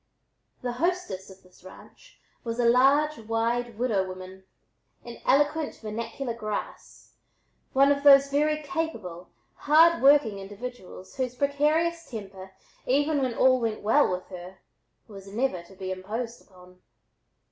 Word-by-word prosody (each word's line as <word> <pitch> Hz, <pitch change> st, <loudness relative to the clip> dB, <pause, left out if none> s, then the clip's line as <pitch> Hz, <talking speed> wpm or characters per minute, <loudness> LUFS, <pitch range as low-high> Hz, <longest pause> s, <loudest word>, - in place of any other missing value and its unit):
The 245 Hz, -, -2 dB
"hostess" 250 Hz, -, -2 dB
of 190 Hz, 0 st, -15 dB
this 185 Hz, -1 st, -22 dB
ranch -, -, -16 dB, 0.2 s
was 230 Hz, -1 st, -4 dB
a 240 Hz, -, +2 dB
large, 275 Hz, +5 st, +4 dB
wide 230 Hz, +1 st, -2 dB
"widow 225 Hz, -5 st, +1 dB
woman," 185 Hz, 0 st, -10 dB, 0.6 s
in 240 Hz, -1 st, -10 dB
eloquent 295 Hz, +3 st, +2 dB
vernacular 230 Hz, +3 st, -5 dB
"grass," 215 Hz, -2 st, -7 dB, 0.6 s
one 275 Hz, +1 st, +5 dB
of 280 Hz, 0 st, 0 dB
those 275 Hz, -1 st, +7 dB
very 305 Hz, +2 st, +1 dB
capable, 230 Hz, -, -5 dB, 0.2 s
hard 325 Hz, -, +4 dB
working 270 Hz, -7 st, +4 dB
individuals 200 Hz, -1 st, -9 dB
whose 255 Hz, -2 st, -2 dB
precarious 305 Hz, +5 st, 0 dB
temper 195 Hz, -4 st, -9 dB, 0.3 s
even 290 Hz, +3 st, +2 dB
when 255 Hz, -3 st, -1 dB
all 255 Hz, 0 st, +4 dB
went 225 Hz, -2 st, -2 dB
well 225 Hz, +8 st, +4 dB
with 180 Hz, 0 st, -4 dB
her, 185 Hz, 0 st, -10 dB, 0.5 s
was 200 Hz, -3 st, -12 dB
never 210 Hz, -2 st, -2 dB
to 170 Hz, +3 st, -17 dB
be 190 Hz, 0 st, -5 dB
imposed 225 Hz, +6 st, -5 dB
upon. 180 Hz, -1 st, -19 dB
235 Hz, 135 wpm, -26 LUFS, 195-280 Hz, 0.6 s, those